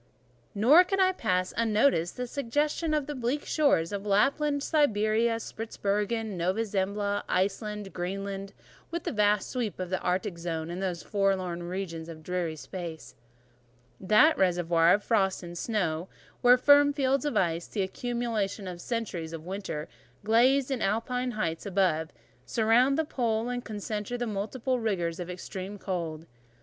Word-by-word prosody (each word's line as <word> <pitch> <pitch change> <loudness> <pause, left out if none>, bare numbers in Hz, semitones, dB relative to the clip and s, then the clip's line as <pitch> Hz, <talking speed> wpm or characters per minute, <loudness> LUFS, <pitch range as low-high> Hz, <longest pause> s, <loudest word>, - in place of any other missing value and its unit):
Nor 265 - +7
could 390 +2 -1
I 375 0 +5
pass 185 - -1
unnoticed 215 -5 +2
the 250 - -2
suggestion 295 +5 -1
of 300 -2 0
the 295 - -4
bleak 260 +2 -2
shores 280 - +2
of 200 -1 -3
Lapland, 280 +8 +2
Siberia, 225 -6 +2
Spitzbergen, 220 -1 -2
Nova 185 +6 0
Zembla, 205 0 -1
Iceland, 205 +1 -1
Greenland, 195 +2 -4 0.4
with 340 0 -4
"the - - -2
vast 210 -2 +2
sweep 235 -8 -2
of 185 -1 -4
the 185 - 0
Arctic 180 -1 -1
Zone, 165 -1 -3
and 180 +2 -5
those 180 -3 -2
forlorn 190 -4 0
regions 175 -2 -5
of 160 -1 -10
dreary 175 -2 -2
space,—that 125 - -2
reservoir 175 -2 +4
of 205 - -5
frost 195 -5 +1
and 175 0 -8
snow, 180 -4 -1 0.3
where 245 +1 +7
firm 285 +2 +6
fields 275 -2 +1
of 295 - -1
ice, 170 -1 0
the 200 - -1
accumulation 220 -2 -2
of 175 -1 -7
centuries 185 -9 -4
of 160 -1 -7
winters, 185 -5 -4 0.4
glazed 250 +5 +3
in 255 -4 -1
Alpine 250 +5 0
heights 170 -5 -2
above 180 -5 +1
heights, - - -27 0.4
surround 240 +5 +4
the 320 - +1
pole, 235 -4 -1
and 245 0 -3
concentre 215 +1 -4
the 245 - -2
multiplied 230 +4 -2
rigours 175 -6 -1
of 180 0 -5
extreme 190 +2 -6
cold." 165 -5 -4
205 Hz, 150 wpm, -28 LUFS, 180-240 Hz, 0.4 s, Nor